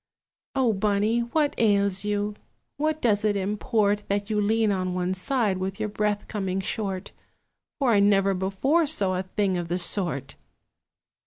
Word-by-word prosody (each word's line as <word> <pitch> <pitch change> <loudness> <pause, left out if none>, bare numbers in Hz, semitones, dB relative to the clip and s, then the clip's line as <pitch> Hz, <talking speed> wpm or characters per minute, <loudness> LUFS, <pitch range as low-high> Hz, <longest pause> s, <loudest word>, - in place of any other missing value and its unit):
"O 255 -4 +2
Bunny, 210 +3 +1
what 285 +5 0
ails 200 -3 +2
you? 205 0 -1 0.4
What 310 +1 -1
does 210 -3 +2
it 210 -1 +2
import 205 +1 0
That 200 +2 -2
you 210 -1 +1
lean 220 +1 +2
on 185 -2 -1
one 180 0 -1
side, 205 -1 0
with 190 +1 -4
your 215 - -2
breath 210 0 -1
coming 195 -3 -2
short? 195 -1 -3 0.7
For 270 -5 +2
I 205 - +4
never 200 -1 +3
before 200 - +1
saw 200 -11 +2
a 185 - -1
thing 190 0 -1
of 175 - -4
the 175 +1 -1
sort!" 175 -6 0
205 Hz, 160 wpm, -25 LUFS, 190-220 Hz, 0.7 s, I